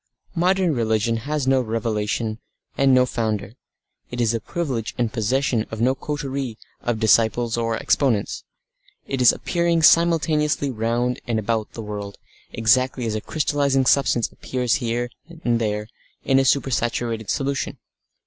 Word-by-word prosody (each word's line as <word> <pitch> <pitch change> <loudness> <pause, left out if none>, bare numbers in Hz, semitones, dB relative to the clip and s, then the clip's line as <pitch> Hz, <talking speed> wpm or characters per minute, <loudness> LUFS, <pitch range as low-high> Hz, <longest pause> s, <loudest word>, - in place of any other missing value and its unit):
Modern 180 0 +2
religion 115 -1 +1
has 150 -3 0
no 135 0 +3
revelation 110 -1 -2 0.4
and 135 -1 +3
no 130 -1 +5
founder; 110 -4 -2 0.6
it 120 - -6
is 115 -2 +2
the 115 - -1
privilege 130 -3 -3
and 120 -3 -1
possession 120 0 0
of 110 - -6
no 125 +3 +3
coterie 135 -4 -4 0.2
of 120 -2 -1
disciples 110 +2 +3
or 115 -1 -1
exponents; 120 -8 0 0.6
it 135 -2 -2
is 125 - +8
appearing 170 -2 0
simultaneously 155 -4 +3
round 120 +2 -1
and 115 -2 0
about 110 0 -2
the 115 - -6
world 105 -1 -6 0.3
exactly 125 +3 +2
as 110 - -1
a 110 - -2
crystallising 140 -2 +1
substance 125 -3 +2
appears 125 -1 -1
here 120 +1 -2 0.3
and 120 -1 +2
there 105 -1 -1 0.4
in 135 0 +3
a 135 - +2
super 135 0 +2
saturated 115 -2 -1
solution. 140 0 -2
120 Hz, 145 wpm, -22 LUFS, 110-135 Hz, 0.6 s, is